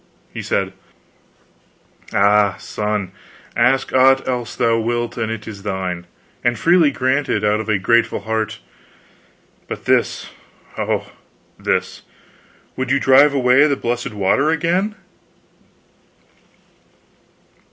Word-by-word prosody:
He - - -5
said: - - -1 1.4
"Ah, 100 0 +3
son, 105 -3 -3 0.4
ask 130 +3 +2
aught 135 +1 +4
else 125 -2 -3
thou 115 0 +2
wilt, 120 +1 -2
and 115 -2 -2
it 110 -1 -6
is 100 -3 -8
thine, 95 -3 -4 0.4
and 120 -1 +1
freely 170 -3 +4
granted 130 -4 0
out 105 0 +2
of 110 0 -5
a 105 - +2
grateful 115 +4 +1
heart 110 -1 -2 1.1
but - - -7
this, - - 0 0.4
oh, - - -2 0.5
this! - - -2 0.7
Would 130 0 -3
you 140 +1 +2
drive 140 +2 +5
away 130 +2 +4
the 140 - +1
blessed 120 0 -3
water 105 +9 +2
again?" 175 +6 0
120 Hz, 110 wpm, -19 LUFS, 105-135 Hz, 1.4 s, drive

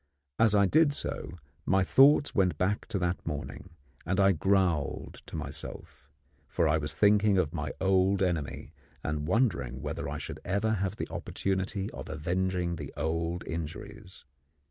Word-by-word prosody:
As 110 -2 +5
I 100 -1 +5
did 150 +7 +4
so, - - -3 0.3
my 95 0 +3
thoughts 140 +8 +5
went 95 -3 +2
back 100 +3 0
to - - -2
that 90 -1 -1
morning, 75 -3 -6 0.3
and 95 +3 -1
I 100 0 +6
growled 90 -4 0
to - - -8
myself; - - -7 0.4
for 85 +2 +1
I 80 +1 +2
was 75 0 -3
thinking 105 -1 +4
of 85 -4 +1
my 80 -3 -3
old 95 +1 +3
enemy, 85 -6 -2 0.3
and 75 0 -2
wondering 85 - 0
whether - - -4
I - - -4
should - - -6
ever 100 +4 0
have 95 -2 -1
the - - -4
opportunity 95 +1 -2
of - - -8
avenging 90 +2 -1
the 75 -4 -7
old 85 +3 -2
injuries. 95 +5 -7
95 Hz, 155 wpm, -29 LUFS, 80-100 Hz, 0.4 s, I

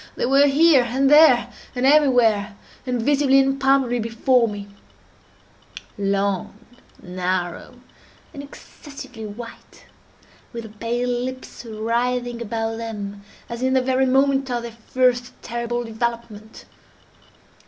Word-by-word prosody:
—they - - -1
were 275 +3 +4
here, 290 0 +5
and 265 +4 +1
there, 295 -6 +6 0.2
and 250 +1 0
everywhere, 245 -8 +3 0.3
and 250 -1 -1
visibly 280 0 +3
and 270 0 +1
palpably 270 -3 +2
before 230 +2 +2
me; 205 -1 -7 1.3
long, 200 -1 -1 0.5
narrow, 180 +4 -3 0.6
and 280 - -7
excessively 280 -5 -11
white, 230 +3 -11 0.7
with 235 -1 -6
the 220 - -10
pale 240 +2 -2
lips 250 +1 -5
writhing 240 +2 -2
about 225 0 -3
them, 205 -3 -6 0.3
as 235 0 -7
in 260 0 +1
the 260 - +4
very 260 +1 +1
moment 270 0 +2
of 240 -1 -2
their 235 - -6 0.2
first 250 -1 0
terrible 235 0 -3
development. 225 -1 -5
240 Hz, 120 wpm, -22 LUFS, 225-265 Hz, 1.3 s, there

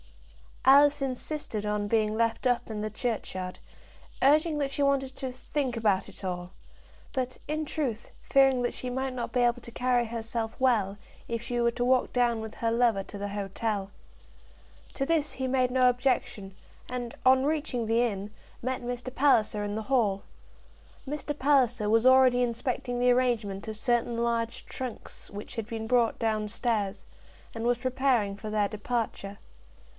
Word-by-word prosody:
Alice 285 +2 +7
insisted 265 -4 -3
on 210 0 -1
being 215 0 +1
left 230 +2 +1
up 240 -1 0
in 210 -1 -4
the 215 - -2
churchyard, 210 -5 -4 0.6
urging 305 +3 +4
that 275 -1 -1
she 285 - -3
wanted 270 -1 +1
to 260 -1 -4
"think 255 0 -3
about 205 -4 +1
it - - -13
all," 180 -1 -4 0.6
but, 255 -2 -2
in 310 +1 -2
truth, 260 -8 -3
fearing 270 -2 +4
that 240 - -1
she 255 - -5
might 260 +1 -2
not 245 -2 -4
be 250 - +1
able 240 0 +2
to 235 - -11
carry 245 0 +1
herself 225 0 -4
well, 215 -7 +2 0.3
if 230 -1 -3
she 240 0 -3
were 235 0 +3
to 245 +1 -2
walk 255 0 +3
down 240 -2 +2
with 220 0 -7
her 230 -1 -1
lover 230 -4 +2
to 205 - -9
the 200 0 -4
hotel. 200 0 -3 1.0
To 275 - -1
this 305 -1 +1
he 260 0 -3
made 255 -1 +2
no 255 0 +5
objection, 245 -6 -1 0.3
and, 245 -1 -4
on 260 0 +6
reaching 290 -6 -1
the 225 +2 +2
inn, 205 -3 -2 0.3
met 255 +1 -2
Mr. 245 +1 -5
Palliser 220 -7 +3
in 205 0 -3
the 220 - -3
hall. 215 -6 +1 0.8
Mr. 295 +1 -4
Palliser 250 -7 +3
was 225 +2 +3
already 260 -1 +6
inspecting 245 0 -2
the 250 0 +4
arrangement 230 -5 0
of 215 -1 -5
certain 240 0 0
large 235 +1 -1
trunks 255 -3 -8
which 205 +3 -8
had 225 -2 -4
been 225 -2 -4
brought 235 -1 +2
down 215 -2 0
stairs, 210 -3 -2 0.5
and 225 0 -4
was 245 0 +3
preparing 255 -5 +1
for 210 +2 -7
their 210 -1 +1
departure. 210 -2 -3
240 Hz, 170 wpm, -28 LUFS, 215-260 Hz, 1.0 s, Alice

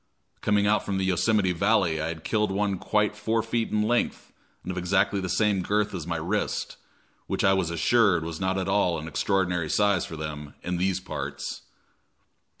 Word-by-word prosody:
Coming 105 -1 +2
out 105 +1 +2
from 100 -1 -2
the 95 - 0
Yosemite 95 +2 +2
Valley, 90 -3 +2
I 80 - -1
had 80 -1 -6
killed 105 -2 +1
one 100 -1 0
quite 105 +1 +1
four 110 +2 0
feet 115 0 -1
in 105 0 +1
length 120 +3 -1 0.3
and 95 - -4
of 95 - -6
exactly 95 +2 +1
the 95 - -3
same 105 -2 +2
girth 105 +3 0
as 85 -4 -5
my 85 -1 -1
wrist, 95 +6 -2 0.5
which - - -1
I 95 - +5
was 95 -3 0
assured 85 +1 +3
was 80 -1 -5
not 95 0 0
at 95 0 -2
all 95 -4 +2
an 80 0 -6
extraordinary 90 -1 0
size 100 -2 +2
for 80 - -7
them 75 -1 -6
"in 90 0 -2
these 95 +1 0
parts." 95 - -5
95 Hz, 190 wpm, -26 LUFS, 85-105 Hz, 0.5 s, I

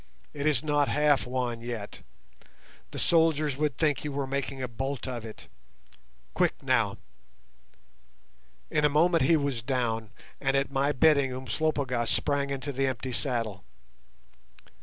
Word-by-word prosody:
It 145 0 -2
is 150 -2 +2
not 145 -2 +2
half 150 -3 +2
won 125 -2 -2
yet. 115 -3 -6 0.9
The - - -8
soldiers 155 -4 +3
would 150 -4 -1
think 150 -3 +1
you 150 - -3
were 140 0 -2
making 135 0 -3
a 130 - -2
bolt 135 +4 -4
of 120 -3 -4
it. 110 -1 -10 0.9
Quick - - 0
now." - - +2 1.7
In 150 - +1
a 150 - +5
moment 165 +3 +3
he 160 +5 +5
was 140 -5 -1
down, 115 -3 -1 0.3
and 135 0 +1
at 135 0 0
my 140 +1 +1
bidding 140 -2 +4
Umslopogaas 130 -1 -1
sprang 145 -1 +1
into 140 0 -3
the 135 0 0
empty 130 0 -3
saddle. 115 -8 -2
135 Hz, 140 wpm, -28 LUFS, 125-150 Hz, 1.7 s, a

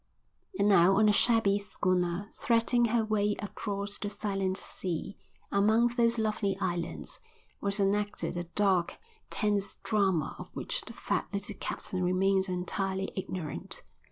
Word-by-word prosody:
And 200 - +3
now 195 -1 +6
on 215 +2 +5
the 210 - +6
shabby 205 -3 +3
schooner, 185 -1 -1
threading 235 +1 +2
her 230 -1 +1
way 210 -1 +1
across 200 -1 -4
the 205 - -3
silent 195 -2 -1
sea, 185 0 -4 0.4
among 220 +4 +4
those 235 -1 +2
lovely 215 -3 0
islands, 175 -3 -3 0.4
was 200 +1 0
enacted 205 -1 0
a 175 0 -3
dark, 185 0 +2 0.3
tense 205 -2 0
drama 195 -7 +1
of - - -8
which - - -2
the - - -8
fat - - -2
little 205 +1 -3
captain 185 -1 -3
remained 190 +1 +2
entirely 190 +1 -2
ignorant. 180 -5 -4
200 Hz, 135 wpm, -30 LUFS, 185-210 Hz, 0.4 s, now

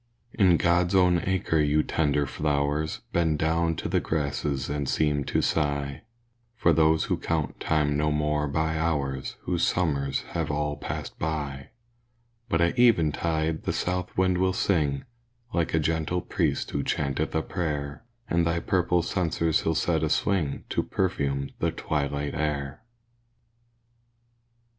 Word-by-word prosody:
In 95 -5 +4
God's 90 +2 +2
own 90 -2 +4
acre 95 -4 +1
your 75 +1 +3
tender 75 -2 +1
flowers, 75 +2 -1
Bend 80 -3 +2
down 80 +1 +1
to - - -4
the - - +2
grasses 70 -2 -2
and 70 -1 -2
seem 75 -2 +1
to - - 0
sigh 70 -3 -1 0.5
For 85 -8 +3
those 80 0 +4
who - - -1
count - - -2
time 75 -2 +1
no 75 0 +1
more 75 0 0
by 80 +2 0
hours 70 -5 -1
Whose 90 -2 -1
summers 70 -6 +1
have - - -2
all 75 0 -1
passed - - -6
by 70 -4 -3 0.8
But 85 - +2
at 85 +6 +1
eventide 80 -7 +2
the - - 0
south 90 0 -2
wind 95 -1 +2
will 95 0 +2
sing, 75 -8 0 0.5
Like 85 -2 0
a - - +3
gentle 80 +3 0
priest 80 -8 -1
who 70 - -1
chanteth 70 +3 -1
a 80 - +1
prayer; 75 -2 -3 0.2
And 85 0 +2
thy 85 0 +1
purple 90 0 +1
censers 85 -3 0
he'll 80 - 0
set 80 0 +1
a 80 - 0
swing, 80 -4 0
To - - +1
perfume 70 -7 -1
the - - +1
twilight 70 -1 -2
air. 75 -1 -2
80 Hz, 145 wpm, -26 LUFS, 75-85 Hz, 0.8 s, In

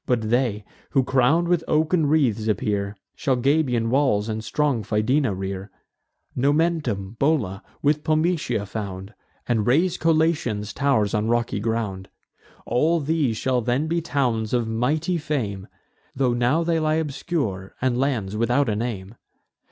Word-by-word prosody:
But 115 -3 0
they, 120 -5 +1 0.2
who 135 -3 +2
crown'd 135 +7 +2
with 175 -2 +2
oaken 155 +1 +2
wreaths 125 -8 +2
appear, 100 -2 -1 0.2
Shall 135 - 0
Gabian 125 -3 +1
walls 125 -6 +2
and 110 0 -3
strong 145 -1 0
Fidena 110 +3 +1
rear; 95 +1 -5 0.7
Nomentum, 140 - 0
Bola, 130 -10 +1 0.2
with 150 +1 +2
Pometia, 155 - 0
found; 100 -1 -6 0.3
And 115 -3 +1
raise 165 +8 +2
Collatian 155 -10 +1
tow'rs 135 -8 +1
on 105 +1 0
rocky 120 -3 0
ground. 105 -4 -3 0.6
All 160 +7 +2
these 145 -6 0
shall 125 +1 0
then 125 +6 0
be 170 +1 0
towns 125 -8 0
of 120 -2 0
mighty 150 +10 0
fame, 115 -11 -3 0.5
Tho' 130 -2 +1
now 125 +7 +2
they 165 -1 +1
lie 155 0 +1
obscure, 140 - -3
and 130 -1 +1
lands 120 -7 -1
without 120 +4 +2
a 105 - 0
name. 105 -3 -4
125 Hz, 140 wpm, -23 LUFS, 110-150 Hz, 0.7 s, who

